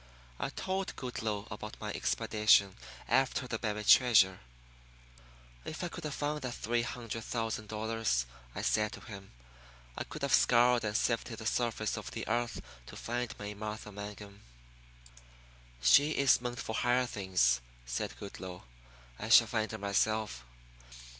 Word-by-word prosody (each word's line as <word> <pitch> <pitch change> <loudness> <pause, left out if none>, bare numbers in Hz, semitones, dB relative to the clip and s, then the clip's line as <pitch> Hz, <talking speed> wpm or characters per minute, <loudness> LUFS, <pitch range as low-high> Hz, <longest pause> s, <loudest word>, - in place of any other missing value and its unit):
I - - -1
told 190 0 -3
Goodloe 110 -5 -4
about - - -7
my - - -4
expedition 105 -3 +3 0.3
after 130 0 +2
the 115 -2 -3
buried 105 -1 -2
treasure. 100 -8 +6 1.2
"If 155 - -6
I 175 - -2
could 175 -1 -8
have 150 - -3
found 150 +1 -2
that 125 -2 -4
three 120 +1 0
hundred 115 -1 -5
thousand 110 -2 -3
dollars," 110 - -1 0.3
I - - -4
said 105 0 +1
to - - -9
him, 100 -3 -10 0.6
"I - - -3
could 150 - -9
have 140 - +1
scoured 120 0 +5
and 105 0 0
sifted 115 -1 -1
the 110 - -8
surface 115 -2 0
of - - -6
the - - -6
earth 120 +1 -1 0.2
to - - -10
find 120 0 -3
May 105 0 -5
Martha 105 0 -6
Mangum." 100 0 -9 1.4
"She 145 - +6
is 135 -3 +4
meant 120 0 -4
for 110 - -4
higher 125 +2 +2
things," 90 - +1 0.2
said - - -3
Goodloe. 95 +1 -8 0.6
"I - - -5
shall - - +9
find 110 -2 -1
her - - -4
myself. 100 - 0
110 Hz, 150 wpm, -32 LUFS, 105-120 Hz, 1.4 s, shall